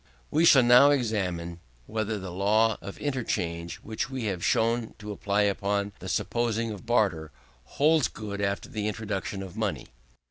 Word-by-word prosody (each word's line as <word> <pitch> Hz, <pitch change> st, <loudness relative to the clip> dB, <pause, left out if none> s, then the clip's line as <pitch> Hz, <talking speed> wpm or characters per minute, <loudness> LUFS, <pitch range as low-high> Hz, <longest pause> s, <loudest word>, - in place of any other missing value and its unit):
2. -, -, -8 dB
We 165 Hz, -, +5 dB
shall 135 Hz, -6 st, +7 dB
now 125 Hz, +4 st, +7 dB
examine 95 Hz, -10 st, -1 dB, 0.3 s
whether 110 Hz, +2 st, -2 dB
the 95 Hz, -1 st, -6 dB
same 90 Hz, -, -8 dB
law 110 Hz, +2 st, +3 dB
of 100 Hz, -, -8 dB
interchange, 85 Hz, -, -2 dB
which 110 Hz, +4 st, -3 dB
we 130 Hz, -2 st, -4 dB
have 95 Hz, -5 st, -2 dB
shown 115 Hz, 0 st, +1 dB
to 105 Hz, 0 st, -7 dB
apply 105 Hz, 0 st, 0 dB
upon 100 Hz, 0 st, 0 dB
the 95 Hz, -, -7 dB
supposition 115 Hz, +2 st, -1 dB
of 105 Hz, +3 st, -11 dB
barter, 95 Hz, -10 st, +1 dB, 0.5 s
holds 150 Hz, -2 st, +4 dB
good 100 Hz, -2 st, -6 dB
after 100 Hz, 0 st, -1 dB
the 105 Hz, -1 st, -3 dB
introduction 105 Hz, -2 st, -4 dB
of 95 Hz, -2 st, -10 dB
money. -, -, -3 dB
105 Hz, 170 wpm, -27 LUFS, 100-115 Hz, 0.5 s, shall